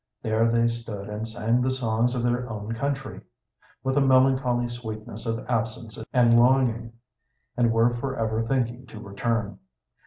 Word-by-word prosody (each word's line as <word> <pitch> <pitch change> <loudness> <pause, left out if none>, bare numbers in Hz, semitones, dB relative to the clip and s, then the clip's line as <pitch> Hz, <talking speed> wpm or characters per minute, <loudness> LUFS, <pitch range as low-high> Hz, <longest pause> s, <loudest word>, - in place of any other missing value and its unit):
There 110 +1 +2
they 115 0 +3
stood 115 -4 -4
and 105 +2 -4
sang 115 +2 0
the 130 - +1
songs 120 -1 0
of 120 - -1
their 120 0 0
own 110 0 -5
country, 135 +3 -3 0.6
with 130 +1 0
a - - +5
melancholy 130 -2 +3
sweetness 110 -2 -7
of 115 0 -2
absence 115 -1 -3
and 120 -2 +5
longing, 120 -2 +2 0.6
and 120 -2 +3
were 115 +1 +3
forever 115 -3 -2
thinking 125 0 -1
to 110 - -10
return. 105 0 -2
115 Hz, 150 wpm, -25 LUFS, 110-125 Hz, 0.6 s, a